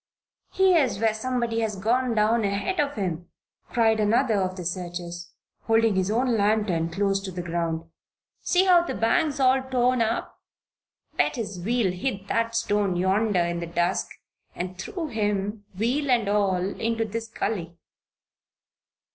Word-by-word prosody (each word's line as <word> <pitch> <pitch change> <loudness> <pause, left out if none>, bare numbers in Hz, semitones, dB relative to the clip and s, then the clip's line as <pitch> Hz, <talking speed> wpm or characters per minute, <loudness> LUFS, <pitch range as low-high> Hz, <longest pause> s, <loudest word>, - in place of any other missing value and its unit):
"Here's 335 - +3
where 220 +1 +2
somebody 235 0 -1
has 220 -2 -1
gone 235 +5 0
down 220 +2 +2
ahead 205 - -1
of 290 -1 0
him," 175 -4 -3 0.4
cried 225 -2 +2
another 215 0 +2
of 185 0 -2
the 180 -2 -7
searchers, 175 -1 -5 0.3
holding 225 -1 +3
his 190 0 0
own 240 +2 +1
lantern 205 -5 +1
close 195 +3 0
to 195 - -5
the 180 -1 -5
ground. 165 -1 -2 0.6
"See 370 +1 +2
how 360 -2 +6
the 345 - -4
bank's 280 +6 +1
all 260 0 +4
torn 255 -1 +1
up? 225 +1 -2 0.8
Bet - - +2
his 205 -6 -5
wheel 230 -2 +1
hit 195 0 -3
that 230 0 0
stone 205 -4 +1
yonder 190 +2 +2
in 170 0 -2
the 170 - -4
dusk 175 +2 0 0.5
and 180 +1 -4
threw 350 - -5
him, 205 -2 -2
wheel 260 +7 0
and 235 -5 +3
all, 200 -2 +2 0.2
into 225 0 0
this 225 +2 -5
gulley." 180 -7 -4
215 Hz, 150 wpm, -25 LUFS, 185-235 Hz, 0.8 s, how